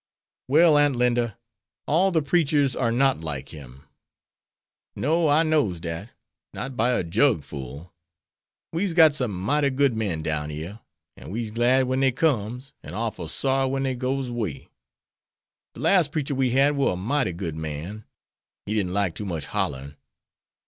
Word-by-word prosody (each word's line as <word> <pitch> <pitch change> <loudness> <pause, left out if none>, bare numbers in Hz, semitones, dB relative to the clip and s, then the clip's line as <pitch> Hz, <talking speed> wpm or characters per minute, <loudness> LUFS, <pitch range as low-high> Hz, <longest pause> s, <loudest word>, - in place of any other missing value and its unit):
"Well, 155 +2 +5
Aunt 145 -2 +3
Linda, 120 -2 +1 0.5
all 180 +6 +3
the 160 -5 +1
preachers 145 -3 +2
are 115 -3 0
not 135 +3 +2
like 70 -4 -5
him." 70 -3 -12 1.1
"No; 160 +3 +1
I 150 +3 +4
knows 145 - +1
dat; 85 +5 -5 0.5
not 135 +1 -5
by 120 +2 +2
a 120 - 0
jug 80 -2 +2
full. 70 +5 -9 0.8
We's 175 +2 -1
got 160 -3 +6
some 130 -5 0
mighty 140 +11 +1
good 135 -2 +1
men 95 -8 -2
down 75 -1 -2
yere, 80 +8 -7 0.4
an' - - -11
we's 110 +2 -4
glad 120 +4 +3
when 130 +1 -1
dey 135 -1 +3
comes, 125 -1 -1
an' - - -9
orful 110 -6 -3
sorry 135 - +1
when 135 0 -1
dey 135 -1 0
goes 130 0 -2
'way. 105 - -4 1.1
De - - -11
las 185 -6 +4
preacher 145 -2 -2
we 130 -1 +1
had 135 +4 +3
war 140 -7 +1
a - - -3
mighty 120 +4 0
good 85 -2 -5
man. 80 +7 -6 0.6
He 105 - -3
didn't 95 -4 -1
like 100 -3 0
too 105 - -6
much 85 -5 -4
hollerin'." 70 +2 -3
120 Hz, 165 wpm, -24 LUFS, 90-140 Hz, 1.1 s, got